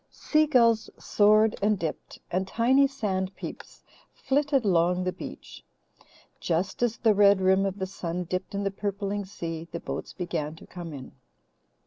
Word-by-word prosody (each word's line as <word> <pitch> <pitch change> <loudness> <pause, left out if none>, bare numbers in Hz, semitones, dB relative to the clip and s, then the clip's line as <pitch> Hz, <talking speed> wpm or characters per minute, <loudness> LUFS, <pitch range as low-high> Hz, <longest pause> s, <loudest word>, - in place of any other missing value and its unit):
Sea 310 0 +1
gulls 230 -6 +3
soared 215 +1 +4
and 210 +1 +2
dipped, 165 -3 -5
and 185 +2 -1
tiny 260 +7 +3
"sand 195 -8 -3
peeps" - - -9 0.3
flitted 275 -2 0
along 180 -1 +2
the 185 - 0
beach. - - -10 0.8
Just 180 +5 -1
as 235 -2 +1
the 225 -3 +3
red 200 -1 +5
rim 190 +1 +3
of 195 0 -4
the 190 - -2
sun 180 -2 -4
dipped 185 +3 -4
in 200 - -1
the 195 - -1
purpling 200 0 -3
sea, 165 -4 -6
the 170 - -4
boats - - -6
began 160 -4 -3
to - - -14
come 175 -2 -8
in. 135 -3 -9
195 Hz, 160 wpm, -27 LUFS, 180-220 Hz, 0.8 s, red